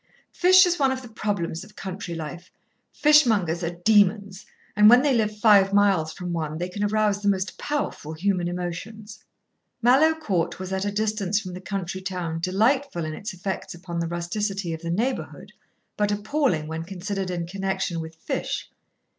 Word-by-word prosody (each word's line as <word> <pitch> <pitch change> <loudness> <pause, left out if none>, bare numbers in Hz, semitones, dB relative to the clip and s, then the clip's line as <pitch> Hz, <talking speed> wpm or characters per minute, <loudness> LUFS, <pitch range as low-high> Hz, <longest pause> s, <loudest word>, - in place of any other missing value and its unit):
Fish 370 +1 +6
is 350 -2 0
one 270 -2 +3
of 260 0 -4
the - - -9
problems 200 -7 -3
of 210 - -16
country 185 -2 -6
life. 165 +2 -7 0.4
Fishmongers 220 - +3
are 170 +1 -3
demons, 205 -2 +3 0.3
and 210 0 +7
when 245 +3 +7
they 285 -2 +3
live 215 -3 0
five 205 -3 +5
miles 195 -6 +3
from 180 +1 -5
one 155 -2 -3
they 175 +2 -3
can 205 +3 -4
arouse 210 -1 +1
the 205 - +2
most 190 -1 -1
powerful 285 - -3
human 180 +1 0
emotions." 200 +5 -6 0.6
Mallowe 270 +7 +5
Court 195 - -1
was 185 0 -5
at 190 +1 -1
a 205 - -1
distance 210 -1 0
from 185 -4 -8
the 180 - -7
country 190 0 -4
town 180 -4 -4
delightful 205 - +1
in 155 - -4
its 205 +7 -6
effects 185 -1 -5
upon 170 -1 -6
the 170 - -1
rusticity 175 +2 -3
of 160 - -6
the 170 - -5
neighbourhood, 235 +10 -3 0.4
but 205 0 +1
appalling 210 - 0
when 160 +1 -4
considered 190 +2 -4
in 175 -2 -3
connection 190 -1 -2
with 160 0 -7
fish. - - -4
195 Hz, 175 wpm, -24 LUFS, 175-215 Hz, 0.6 s, and